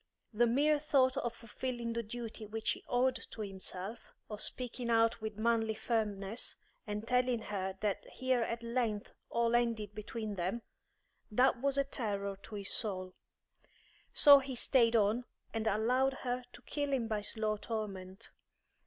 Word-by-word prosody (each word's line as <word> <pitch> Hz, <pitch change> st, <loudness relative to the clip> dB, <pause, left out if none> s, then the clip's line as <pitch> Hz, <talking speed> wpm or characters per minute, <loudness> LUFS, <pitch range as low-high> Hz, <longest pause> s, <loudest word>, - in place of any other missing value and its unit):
The 235 Hz, +3 st, +4 dB
mere 290 Hz, +5 st, +3 dB
thought 270 Hz, -4 st, +3 dB
of 240 Hz, -, 0 dB
fulfilling 235 Hz, +1 st, -4 dB
the 235 Hz, -, -1 dB
duty 225 Hz, -1 st, -6 dB
which 220 Hz, +1 st, -1 dB
he -, -, -5 dB
owed 255 Hz, +1 st, +2 dB
to 220 Hz, -, -7 dB
himself, 195 Hz, +2 st, -6 dB, 0.2 s
of 210 Hz, 0 st, -5 dB
speaking 245 Hz, -1 st, -3 dB
out 230 Hz, -1 st, +3 dB
with 215 Hz, -1 st, -4 dB
manly 225 Hz, -1 st, +2 dB
firmness, 215 Hz, -1 st, -1 dB, 0.3 s
and 210 Hz, +2 st, -4 dB
telling 250 Hz, 0 st, +3 dB
her 190 Hz, -3 st, -3 dB
that 205 Hz, -2 st, -1 dB
here 255 Hz, -1 st, 0 dB
at 230 Hz, 0 st, -2 dB
length 230 Hz, -3 st, -1 dB, 0.2 s
all 235 Hz, 0 st, +1 dB
ended 230 Hz, -4 st, +1 dB
between 215 Hz, 0 st, -4 dB
them 185 Hz, +7 st, -1 dB, 0.7 s
that 250 Hz, +2 st, +3 dB
was 280 Hz, 0 st, +1 dB
a 275 Hz, -, +4 dB
terror 200 Hz, -7 st, -3 dB
to 200 Hz, +2 st, -11 dB
his 200 Hz, -1 st, -2 dB
soul. 185 Hz, -4 st, 0 dB, 1.0 s
So 285 Hz, -1 st, +9 dB
he 265 Hz, -1 st, -5 dB
stayed 235 Hz, -1 st, +3 dB
on 220 Hz, +3 st, +3 dB, 0.3 s
and 225 Hz, 0 st, -1 dB
allowed 250 Hz, +6 st, +3 dB
her 250 Hz, 0 st, -1 dB
to 240 Hz, -, -13 dB
kill 290 Hz, -1 st, -2 dB
him 245 Hz, -4 st, +1 dB
by 215 Hz, -2 st, -1 dB
slow 215 Hz, 0 st, -1 dB
torment. 195 Hz, -4 st, -5 dB
230 Hz, 155 wpm, -34 LUFS, 210-245 Hz, 1.0 s, So